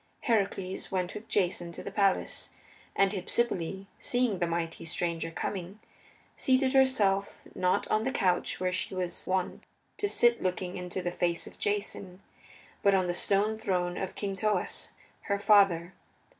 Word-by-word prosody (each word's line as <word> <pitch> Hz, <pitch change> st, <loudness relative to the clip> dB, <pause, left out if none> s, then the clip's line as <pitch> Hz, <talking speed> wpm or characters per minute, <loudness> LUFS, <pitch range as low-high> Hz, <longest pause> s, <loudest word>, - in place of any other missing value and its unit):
Heracles 195 Hz, -5 st, -1 dB
went 185 Hz, -2 st, -1 dB
with 210 Hz, +2 st, -8 dB
Jason 175 Hz, -3 st, 0 dB
to -, -, -8 dB
the 200 Hz, -, -6 dB
palace, 195 Hz, -1 st, +1 dB, 0.5 s
and 195 Hz, -1 st, +4 dB
Hypsipyle, 190 Hz, -2 st, -1 dB
seeing 245 Hz, -6 st, +1 dB
the 175 Hz, -, +1 dB
mighty 165 Hz, -1 st, -3 dB
stranger 165 Hz, 0 st, -1 dB
coming, 185 Hz, +3 st, -4 dB, 0.6 s
seated 260 Hz, 0 st, +2 dB
herself, 210 Hz, -8 st, +3 dB
not 180 Hz, 0 st, +1 dB
on 215 Hz, -, +2 dB
the 265 Hz, -, 0 dB
couch 180 Hz, -7 st, +1 dB
where 185 Hz, 0 st, 0 dB
she 185 Hz, +1 st, -2 dB
was 180 Hz, -1 st, -3 dB
wont 185 Hz, -1 st, -1 dB, 0.3 s
to 410 Hz, -, 0 dB
sit 240 Hz, -7 st, +4 dB
looking 185 Hz, 0 st, -2 dB
into 180 Hz, 0 st, -4 dB
the 175 Hz, -, -1 dB
face 175 Hz, -1 st, 0 dB
of -, -, -13 dB
Jason, 200 Hz, -2 st, -2 dB, 0.6 s
but 200 Hz, -1 st, +5 dB
on 185 Hz, -1 st, +2 dB
the 175 Hz, -, 0 dB
stone 205 Hz, +4 st, +2 dB
throne 180 Hz, -4 st, -1 dB
of 190 Hz, -, -4 dB
King 200 Hz, -2 st, -3 dB
Thoas, 210 Hz, +2 st, -1 dB, 0.4 s
her 200 Hz, -, +1 dB
father. 195 Hz, -4 st, +4 dB
190 Hz, 155 wpm, -30 LUFS, 180-205 Hz, 0.6 s, but